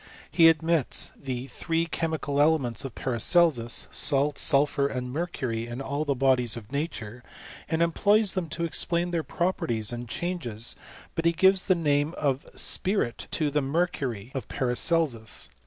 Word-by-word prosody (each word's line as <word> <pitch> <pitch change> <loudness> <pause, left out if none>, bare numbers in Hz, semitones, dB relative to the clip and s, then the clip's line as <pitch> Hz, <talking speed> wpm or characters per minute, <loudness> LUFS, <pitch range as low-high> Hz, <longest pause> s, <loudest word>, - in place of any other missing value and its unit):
He 165 -2 +6
admits 160 -2 0
the 130 -2 -5
three 165 +5 -2
chemical 160 -3 -2
elements 145 -7 +1
of 135 -4 -7
Paracelsus, 125 0 +2
salt, 145 0 +3
sulphur, 140 0 +3
and 125 -2 -5
mercury, 130 -9 -3
in 120 +2 -6
all 140 +2 -3
the 140 -2 0
bodies 125 -3 +2
in 115 - -7
nature, 125 -6 -5 0.5
and 160 0 +1
employs 205 +5 +2
them 180 -4 -3
to 170 +2 -2
explain 170 +2 0
their 170 -2 0
properties 125 - -1
and 120 -1 -7
changes; 120 -10 -3 0.4
but 165 - -3
he 170 - +4
gives 190 +2 +3
the 185 - +4
name 150 -1 0
of 140 -2 -1
^pirit 190 - 0
to 150 -2 0
the 150 +1 +1
mercury 135 - -2
of 135 - -5
Paracelsus. 125 -2 0
145 Hz, 150 wpm, -26 LUFS, 125-170 Hz, 0.5 s, He